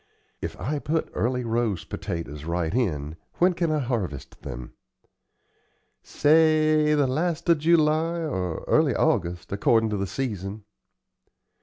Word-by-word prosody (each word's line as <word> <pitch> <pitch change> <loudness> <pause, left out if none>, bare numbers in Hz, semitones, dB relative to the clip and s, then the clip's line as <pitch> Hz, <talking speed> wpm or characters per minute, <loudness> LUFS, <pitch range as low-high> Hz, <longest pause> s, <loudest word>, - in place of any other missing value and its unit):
If - - -5
I 145 +9 -2
put 160 +3 -2
Early 125 +2 0
Rose 115 -4 -1
potatoes 75 -3 -5
right 85 +1 -2
in, 80 - -1 0.2
when 180 +1 +3
can 170 -1 -1
I 155 - +1
harvest 105 - -3
them?" - - -8 1.3
"Say 155 0 +3
the 145 -2 +3
last 155 +6 -1
of 165 -2 +5
July 160 +1 +3
or 95 - -3
early - - +3
August, 85 0 0
accordin' 110 +2 +2
to 105 - -1
the 100 0 -2
season." 105 -4 -4
120 Hz, 130 wpm, -25 LUFS, -, 1.3 s, of